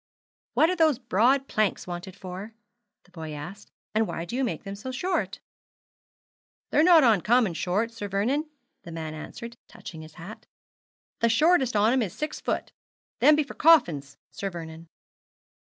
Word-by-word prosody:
'What 325 +3 +4
are - - 0
those 315 -6 +3
broad 250 +4 +2
planks 215 -2 0
wanted 175 +1 -7
for?' 195 +3 -8 0.5
the 180 - -26
boy 160 -3 -7
asked; 175 +8 -9 0.2
'and 220 0 +2
why 165 - -4
do 205 - -6
you 265 - 0
make 245 - -3
them 195 -1 -6
so 210 +6 -7
short?' 355 +8 -2 1.3
'They're - - +4
not 330 -2 +7
uncommon 225 -2 +3
short, 190 +8 -1
Sir 225 -3 -6
Vernon,' 250 +11 -1 0.3
the 170 - -10
man 160 -1 -5
answered, 235 +9 -9
touching 160 -2 -10
his 155 0 -13
hat; 180 +6 -11 0.7
'the 230 - +3
shortest 270 0 +3
on 210 +3 +4
'em 260 - +2
is 195 -6 -3
six 305 0 -4
foot. - - -2 0.5
Them 305 - +6
be 305 - +2
for 280 - -10
coffins, 160 - +3
Sir 200 - -4
Vernon.' 165 -2 -9
215 Hz, 165 wpm, -26 LUFS, 175-260 Hz, 1.3 s, not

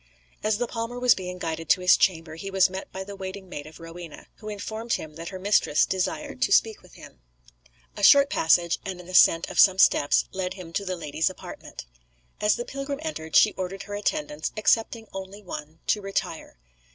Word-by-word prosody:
As 215 -1 +1
the 245 - -1
palmer 230 +1 -5
was 250 -1 +5
being 180 -1 -6
guided 165 -2 -5
to 185 - +4
his 180 0 +6
chamber 165 -4 0
he 180 +5 -7
was 190 -1 +3
met 190 0 -7
by 190 - -5
the 200 +1 -9
waiting 190 0 -7
maid 145 -4 -7
of 155 - -13
Rowena, 165 -1 -10
who 215 - -8
informed 220 +2 -4
him 155 -1 -4
that 165 +2 -7
her 190 - -7
mistress 185 -6 +2
desired 255 +10 -3
to - - +2
speak 220 -2 +3
with - - -19
him. - - -14 0.7
A - - -7
short 280 0 +7
passage 170 - +3
and 190 -2 -5
an 175 - -12
ascent 170 -2 +5
of - - -4
some 190 -2 +7
steps 145 -6 +4
led 185 0 -3
him 175 -3 -10
to 200 - -2
the 185 -1 -3
lady's 160 0 -1
apartment. 185 - -10 0.5
As 210 0 +3
the 240 - -5
pilgrim 275 +1 -5
entered 160 - -5
she 215 - +6
ordered 190 +1 -5
her 205 - -9
attendants, 300 +8 -2
excepting 225 +1 +1
only 195 +2 -8
one, 155 -3 -8
to 210 - +2
retire. 195 - -4
190 Hz, 200 wpm, -25 LUFS, 170-215 Hz, 0.7 s, short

